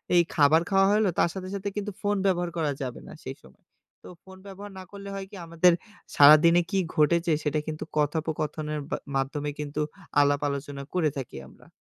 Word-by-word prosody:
এই 175 - +6
খাবার 155 +2 +5
খাওয়া 195 0 +4
হলো 210 -2 +3
তার - - +4
সাথে 185 -1 -6
সাথে 200 +1 -3
কিন্তু 210 0 -3
ফোন 205 0 +1
ব্যবহার 175 -2 +1
করা 155 -3 0
যাবে 125 -2 -4
না - - -10
সেই - - -6
সময়। 65 0 -20 0.4
তো - - -11 0.2
ফোন 190 0 -14
ব্যবহার 200 +1 -9
না - - -8
করলে 200 0 -9
হয় 195 -1 -5
কি, - - -10
আমাদের 170 +2 +4 0.4
সারাদিনে 155 +4 +7
কি 195 - +1 0.2
ঘটেছে 165 +2 +3
সেটা 150 0 0
কিন্তু 155 0 -4
কথোপকথনের 150 0 -1
বা - - -1 0.2
মাধ্যমে 145 +2 -1
কিন্তু 150 0 -3 0.4
আলাপ-আলোচনা 145 -1 -1
করে 170 -4 +2
থাকি 130 - -6
আমরা। - - -19
160 Hz, 185 wpm, -26 LUFS, 145-190 Hz, 0.4 s, সারাদিনে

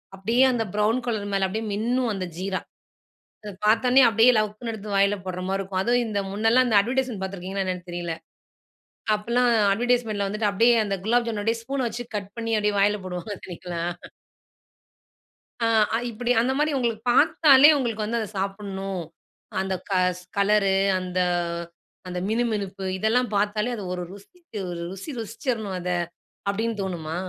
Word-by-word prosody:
அப்டியே 230 +7 +3
அந்த 230 -2 0
brown 215 +4 +2
colour 210 -3 -2
மேல 195 -1 +2
அப்டியே 220 +4 -3
மின்னும், 240 +3 0
அந்த 190 -2 -3
ஜீரா. 185 0 -2 0.8
அத 210 - -6
பாத்தோனே 250 +4 +5
அப்டியே 225 +4 +6
லவக்குன்னு 215 +2 -2
எடுத்து 210 -1 -8
வாயில 200 +1 +3
போடுற 185 0 -4
மாரி 195 0 0
இருக்கும். 190 -1 -2
அதுவும் 240 +2 +2
இந்த 205 -2 -1
முன்னல்லாம் 225 +5 +3
இந்த 210 -3 +5
அட்வர்டைஸ்மென்ட் 245 -1 -1
பாத்திருக்கீங்களா? 190 +1 -4
என்னன்னு 180 -1 -4
தெரியல்ல. 175 -1 -3 1.0
அப்பல்லாம் 240 +3 +1 0.2
அட்வர்டைஸ்மென்ட்ல 225 -3 0
வந்துட்டு 210 +1 0
அப்டியே 230 +4 +4
அந்த 200 -1 -1
குலாப் 235 +1 +2
ஜாமு 215 -2 -2
அப்டியே 225 +1 0
ஸ்பூன் 270 0 -2
வச்சி 240 +2 -5
கட் 200 0 -7
பண்ணி 230 0 -3
அப்டியே 210 0 0
வாயில 205 +1 +3
போடுவாங்க. 180 +2 -5
பார்தீங்களா? 180 -2 -7 1.8
ஆ, - - +3 0.3
அ - - +3
இப்டி 240 +2 -2
அந்த 255 +3 +1
மாரி 305 0 +2
உங்களுக்கு 230 -3 -1
பாத்தாலே 290 +1 +6
உங்களுக்கு 230 -5 -2
வந்து 230 +2 -1
அத 220 - -3
சாப்பிடணும், 195 -1 -3 0.6
அந்த 190 0 -1 0.2
கஸ் 180 -1 +1 0.2
கலரு 200 -1 +3 0.2
அந்த 185 0 -3 0.9
அந்த 180 0 -4
மினுமினுப்பு 210 -4 -1
இதெல்லாம் 225 +5 +1
பாத்தாலே 210 +3 +1
அது 210 - -6
ஒரு 180 - -4
ருசிச்சு 225 - -11 0.3
ருசி 195 +10 -7
ருசிச்சிரணும் 225 -3 -3
அத! 180 0 -4 0.6
அப்டின்னு 220 +2 -2
தோணுமா? 165 -4 -4
210 Hz, 150 wpm, -25 LUFS, 195-235 Hz, 1.8 s, அப்டியே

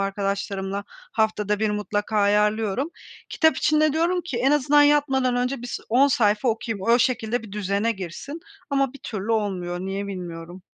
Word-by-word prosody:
arkadaşlarımla 195 0 -2 0.3
haftada 210 -1 0
1 220 -1 +1
mutlaka 210 +1 -2
ayarlıyorum. 210 - +1 0.4
Kitap 320 -1 +2
için 305 0 +2
de 310 -1 +3
diyorum 340 +3 +1
ki 335 -7 -5
en 260 +3 +2
azından 295 0 +4
yatmadan 270 -4 +3
önce 250 0 -1
bis 245 - -4
10 260 +5 +4
sayfa 220 -4 +2
okuyayım, 225 -3 -2
o 235 +1 +5
şekilde 235 -1 0
bir 215 -3 -11
düzene 205 +2 0
girsin 195 - -7 0.3
ama 275 -2 +1
bir 280 - -12
türlü 215 0 -3
olmuyor. 185 -5 -2
Niye 195 +2 -3
bilmiyorum. 175 -1 -7
220 Hz, 160 wpm, -24 LUFS, 200-265 Hz, 0.4 s, o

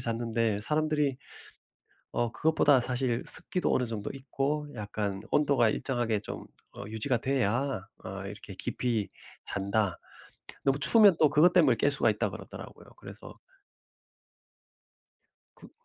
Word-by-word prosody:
잤는데 115 -3 -1
사람들이 150 0 0 1.0
어 120 -1 -1
"그것보다 150 -1 +3
사실 125 -1 -1
습기도 180 - +4
어느 125 - 0
정도 110 -3 -5
있고 140 +2 -3
약간 105 -2 -4
온도가 140 -6 +3
일정하게 120 -4 -1
좀 - - -8 0.3
어 100 - -9
유지가 110 +4 -1
돼야 130 -3 -1 0.2
어 95 +1 -6
이렇게 105 -1 -10
깊이 115 0 -2 0.4
잔다." 100 -1 -1 0.7
너무 135 0 +2
추우면 205 - +6
또 155 - +5
그것 175 +5 +4
때문에 150 -9 +4
깰 145 - +2
수가 - - +3
있다고 - - -3
그러더라고요. - - -11
그래서 - - -12 2.2
그 - - -15
120 Hz, 280 characters per minute, -28 LUFS, 110-145 Hz, 2.2 s, 추우면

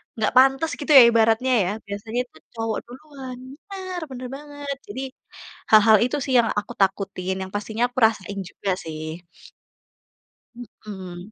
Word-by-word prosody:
enggak 220 -2 0
pantas 270 +4 +5
gitu 290 - -2
ya 260 - +12
ibaratnya 230 +2 +3
ya, - - -1 0.2
biasanya 210 +4 -4
itu - - -21 0.2
cowok 225 -1 -2
duluan. 260 -1 -10 0.3
Benar 375 -2 -5
benar 255 -1 -7
banget. 290 -1 -6
Jadi 210 +6 -6 0.7
hal-hal 215 0 +7
itu 250 +4 -1
sih 265 - -3
yang 230 - 0
aku 205 - -10
takutin, 195 -1 0
yang 190 - -6
pastinya 220 +3 -1
aku 250 - -10
rasain 200 -2 -6
juga 200 - -4
sih. 155 +2 -7 1.3
Mhm. 195 -5 -10
225 Hz, 145 wpm, -23 LUFS, 200-260 Hz, 1.3 s, ya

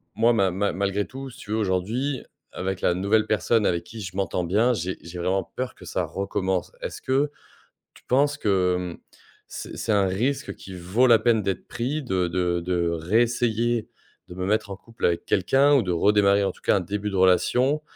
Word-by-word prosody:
moi, 115 +2 +4
ma 95 -4 +2
ma 100 +1 -1
malgré 100 +2 -1
tout 135 +1 -8
si 125 - -14
tu 105 - -9
veux 110 - +1
aujourd'hui, 110 +8 -1 0.3
avec 95 0 -4
la 90 - +3
nouvelle 100 +4 +2
personne 110 +1 +1
avec 85 -2 0
qui 115 -1 -9
je 95 -1 -7
m'entends 90 -2 -1
bien, 110 +8 +2
j'ai 95 -3 -3
j'ai 85 +3 -9
vraiment 95 +2 0
peur 130 -2 -4
que - - -14
ça - - -2
recommence. 95 -1 -2
Est-ce - - -6
que 140 +3 +1 0.6
tu - - -20
penses 145 +3 +2
que, 95 -6 +2 0.2
mmh, - - -14 0.5
c'est - - -7
c'est 115 - -2
un 100 -2 +3
risque 130 +10 -1
qui 95 - -11
vaut 95 +8 +1
la 115 -2 +6
peine 115 -4 +2
d'être 95 -1 -3
pris? 135 +6 -2
De 95 -9 0
de 90 0 0
de 85 -1 0
réessayer 115 +6 +1 0.4
de 90 - -9
me 90 0 -3
mettre 105 +1 0
en - - -4
couple 115 +3 -5
avec 85 -1 +1
quelqu'un, 135 +9 +3
ou 135 - +4
de 90 - -2
redémarrer, 100 +2 +3
en - - 0
tout - - -21
cas, - - +3
un - - +1
début 100 +3 -3
de - - -4
relation. 125 +10 +3
100 Hz, 205 wpm, -25 LUFS, 90-120 Hz, 0.6 s, la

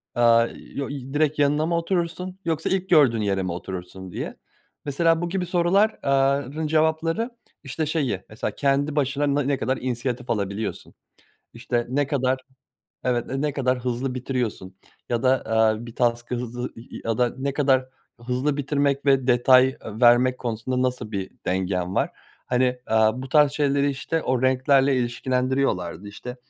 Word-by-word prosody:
aaa, 115 -1 +5 0.3
yo 140 -1 -3
y 135 -1 -7
direkt 150 0 +1
yanına 145 +2 +3
mı 170 - +1
oturursun 180 +1 -2
yoksa 160 -1 -1
ilk 190 0 -1
gördüğün 135 -10 +5
yere 95 -2 0
mi 90 - -2
oturursun 90 +1 -7
diye. - - -5 0.5
Mesela, 165 +3 +2
bu 175 - -2
gibi 185 0 -1
sorular 180 +5 +2
aaa, 140 0 +3
rın 150 +5 -4
cevapları, 160 +8 +1 0.3
işte, 155 +3 -3
şeyi, 145 - -1
mesela, 110 - -3
kendi 140 +1 +1
başına 140 0 +1
na 145 - +2
ne 140 0 0
kadar 130 +1 -1
inisiyatif 125 0 -3
alabiliyorsun? 100 0 -3 0.6
İşte, 120 0 -2
ne 140 +1 +1
kadar, 130 -2 0 0.7
evet, 120 -2 0
n 135 +1 -3
ne 150 -1 0
kadar 130 -2 0
hızlı 125 +1 -2
bitiriyorsun? 120 -7 -3 0.3
Ya 120 +1 -1
da, 130 +1 +3
aaa, 110 0 +2
bir 115 - -10
task'ı 120 0 0
hızlı 120 0 -4
y 115 +2 -10
ya 115 -1 0
da 125 -1 +2
ne 140 +1 -2
kadar 135 -2 +2 0.3
hızlı 125 +4 -1
bitirmek 140 0 0
ve 135 -2 +3
detay 130 +1 +5 0.2
vermek 125 +1 +5
konusunda 125 +2 -2
nasıl 125 -4 -5
bir 95 -2 -4
dengen 90 0 -1
var? - - +1 0.4
Hani, 125 0 +1
aaa, 110 +2 +2
bu 130 - -8
tarz 150 -1 +5
şeyleri, 140 -1 +1
işte, 160 +4 -2
o 130 -1 0
renklerle 135 +1 +3
ilişkilendiriyorlardı, 125 -6 -1
işte, 125 +4 -8
130 Hz, 160 wpm, -24 LUFS, 120-145 Hz, 0.7 s, aaa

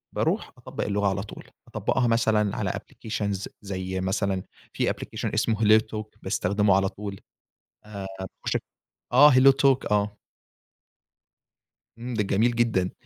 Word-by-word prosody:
باروح - - 0
أطبَّق - - -5
اللغة 100 0 0
على 100 0 -1
طول، 105 - -10 0.2
أطبَّقها 125 -2 0
مثلًا 110 -3 +2
على - - -1
applications 105 -2 -4
ز 100 0 -3
زي 95 -2 -4
مثلًا 95 0 -1 0.3
في - - 0
application - - -4
اسمه 115 - +1
HelloTalk 110 0 +3
باستخدمه 100 +1 +2
على 95 0 +2
طول 100 -1 -7 0.7
آآ 100 -2 -7 0.4
باخش - - 0
أك - - -1 0.5
آه 150 0 +8
HelloTalk 135 -1 +4
آه. 105 0 +1 1.8
امم، 120 +1 -5
ده 110 - +1
جميل 105 +4 +2
جدًا. 110 -6 +1
105 Hz, 135 wpm, -26 LUFS, 100-115 Hz, 1.8 s, آه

